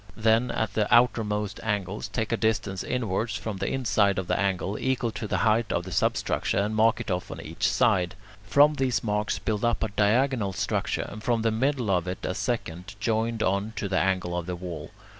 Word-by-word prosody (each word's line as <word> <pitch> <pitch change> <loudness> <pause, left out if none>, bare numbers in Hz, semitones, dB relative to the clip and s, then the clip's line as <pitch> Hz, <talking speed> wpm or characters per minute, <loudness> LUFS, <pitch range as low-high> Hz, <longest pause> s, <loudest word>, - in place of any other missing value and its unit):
Then 110 +2 +3
at 110 -2 -2
the 105 -1 0
outermost 110 -4 +2
angles 105 -2 -2
take 110 -1 -2
a - - +3
distance 110 -4 -1
inwards, 110 -2 -1
from 105 0 -4
the - - -2
inside 105 -6 +2
of 95 - -1
the - - 0
angle, 100 +1 0
equal 130 -3 0
to 110 0 -5
the - - 0
height 110 +1 +2
of 85 - 0
the 95 - -8
substructure, - - 0
and 105 +2 0
mark 110 +1 +3
it 120 - -4
off 90 0 -2
on - - -7
each 80 +2 -1
side; 95 -8 +2 0.3
from 145 +9 +5
these 130 -4 0
marks 105 -1 0
build 105 -1 -2
up 120 -1 +1
a 110 - 0
diagonal 105 +1 +2
structure 95 +1 -1
and 105 - -8
from 115 -1 0
the 115 - +2
middle 125 -1 0
of 90 -1 +1
it 90 0 -4
a - - -1
second, 95 -5 -3
joined 115 +1 0
on 100 +3 0
to 100 - -2
the 95 -1 +1
angle 95 -2 0
of 90 0 -3
the 90 - -2
wall. 85 -4 -7
105 Hz, 210 wpm, -26 LUFS, 95-115 Hz, 0.3 s, from